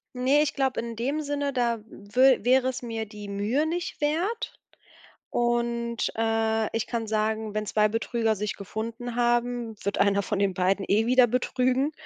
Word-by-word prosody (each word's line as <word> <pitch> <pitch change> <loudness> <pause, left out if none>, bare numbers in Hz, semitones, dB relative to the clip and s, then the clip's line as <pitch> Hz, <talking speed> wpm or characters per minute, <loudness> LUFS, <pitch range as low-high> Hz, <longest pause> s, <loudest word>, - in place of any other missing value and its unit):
Ne, 260 +4 +3
ich 300 - 0
glaube 265 -2 0
in 230 0 -4
dem 275 +7 -1
Sinne, 285 -1 -2
da 235 -2 +1
wür 245 +4 +2
wäre 260 +1 +4
es 255 - -5
mir 225 -2 -4
die 210 -1 -10
Mühe 205 +9 0
nicht 345 +2 -3
wert. 360 +11 -1 0.8
Und, 235 -1 0
äh, 225 -1 0
ich 225 - -1
kann 230 -2 -2
sagen: 215 0 -1
„Wenn 215 0 -2
2 210 0 +2
Betrüger 225 0 0
sich 210 +1 -3
gefunden 230 +4 -5
haben, 240 -1 0
wird 200 +1 -1
einer 200 0 +3
von 200 0 -2
den 200 -1 +2
beiden 190 +2 +1
eh 215 +3 +3
wieder 250 0 +5
betrügen. 255 +3 +1
235 Hz, 170 wpm, -26 LUFS, 215-255 Hz, 0.8 s, wieder